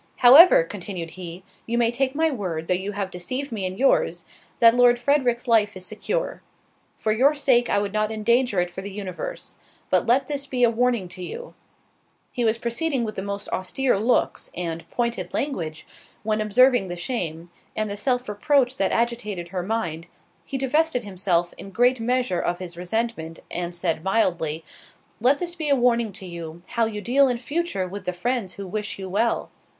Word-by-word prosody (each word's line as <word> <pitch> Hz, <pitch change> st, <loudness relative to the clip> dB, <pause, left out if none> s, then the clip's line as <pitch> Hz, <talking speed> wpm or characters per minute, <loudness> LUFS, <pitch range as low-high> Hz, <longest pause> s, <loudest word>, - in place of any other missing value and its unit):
"However," 270 Hz, -, +8 dB
continued 175 Hz, -2 st, -6 dB
he, 180 Hz, 0 st, -7 dB, 0.2 s
"you 235 Hz, +1 st, 0 dB
may 235 Hz, -1 st, +3 dB
take 260 Hz, +2 st, -1 dB
my 320 Hz, +1 st, +2 dB
word, 180 Hz, -, -3 dB
though 180 Hz, -, +1 dB
you 190 Hz, +3 st, -2 dB
have 195 Hz, -1 st, -3 dB
deceived 255 Hz, +10 st, -4 dB
me 200 Hz, -5 st, -1 dB
in 185 Hz, +1 st, -6 dB
your's, 275 Hz, -, +2 dB, 0.3 s
that 230 Hz, -1 st, +7 dB
Lord 245 Hz, 0 st, +5 dB
Frederick's 245 Hz, -2 st, +1 dB
life 215 Hz, -4 st, +3 dB
is 185 Hz, -, -8 dB
secure. 215 Hz, -, -3 dB, 0.6 s
For 215 Hz, -, 0 dB
your 265 Hz, +7 st, +4 dB
sake, 255 Hz, -4 st, +3 dB
I -, -, +2 dB
would 205 Hz, 0 st, -1 dB
not 215 Hz, 0 st, 0 dB
endanger 230 Hz, 0 st, +2 dB
it 175 Hz, 0 st, 0 dB
for 190 Hz, -, -6 dB
the 200 Hz, -, -6 dB
universe. 205 Hz, -, -6 dB, 0.3 s
But -, -, +3 dB
let 250 Hz, +4 st, +4 dB
this 280 Hz, -1 st, -4 dB
be 250 Hz, -2 st, 0 dB
a 235 Hz, -, +5 dB
warning 235 Hz, -4 st, +1 dB
to 185 Hz, -, -9 dB
you"—— 480 Hz, -, -7 dB, 0.8 s
He 245 Hz, -, -2 dB
was 225 Hz, 0 st, +2 dB
proceeding 240 Hz, +3 st, -1 dB
with 215 Hz, -1 st, -3 dB
the 190 Hz, -, -4 dB
most 200 Hz, +1 st, -4 dB
austere 220 Hz, +5 st, 0 dB
looks, 235 Hz, +4 st, 0 dB
and 165 Hz, -2 st, -4 dB
pointed 235 Hz, -7 st, -2 dB
language, 170 Hz, -, -3 dB, 0.4 s
when 215 Hz, 0 st, 0 dB
observing 245 Hz, +1 st, +4 dB
the 175 Hz, -, -4 dB
shame, 175 Hz, -5 st, -3 dB, 0.2 s
and 215 Hz, 0 st, -1 dB
the 200 Hz, -, -4 dB
self 250 Hz, +3 st, -1 dB
reproach 255 Hz, +5 st, +1 dB
that 195 Hz, -, +1 dB
agitated 230 Hz, -7 st, -1 dB
her 185 Hz, 0 st, -3 dB
mind, 175 Hz, -5 st, -3 dB, 0.4 s
he 270 Hz, -, -4 dB
divested 270 Hz, 0 st, +1 dB
himself 180 Hz, -3 st, 0 dB
in 195 Hz, -, -6 dB
great 245 Hz, +5 st, +2 dB
measure 245 Hz, -5 st, 0 dB
of 175 Hz, -, -1 dB
his 175 Hz, -2 st, -7 dB
resentment, 180 Hz, -3 st, -3 dB
and 175 Hz, 0 st, -3 dB
said, 170 Hz, -2 st, -1 dB
mildly, 175 Hz, -6 st, 0 dB, 0.5 s
"Let 255 Hz, +5 st, +4 dB
this 345 Hz, +1 st, -3 dB
be 315 Hz, -4 st, -3 dB
a 280 Hz, -, +5 dB
warning 235 Hz, -3 st, +2 dB
to 195 Hz, 0 st, -8 dB
you, 170 Hz, -1 st, -8 dB
how 235 Hz, -1 st, +1 dB
you 210 Hz, -2 st, -5 dB
deal 270 Hz, +5 st, +4 dB
in 245 Hz, -2 st, 0 dB
future 270 Hz, -, -2 dB
with 200 Hz, +3 st, -8 dB
the 180 Hz, -, -1 dB
friends 230 Hz, +1 st, -2 dB
who 200 Hz, -, -7 dB
wish 210 Hz, +2 st, -4 dB
you 190 Hz, -1 st, -6 dB
well. 220 Hz, +5 st, 0 dB
220 Hz, 190 wpm, -24 LUFS, 185-250 Hz, 0.8 s, However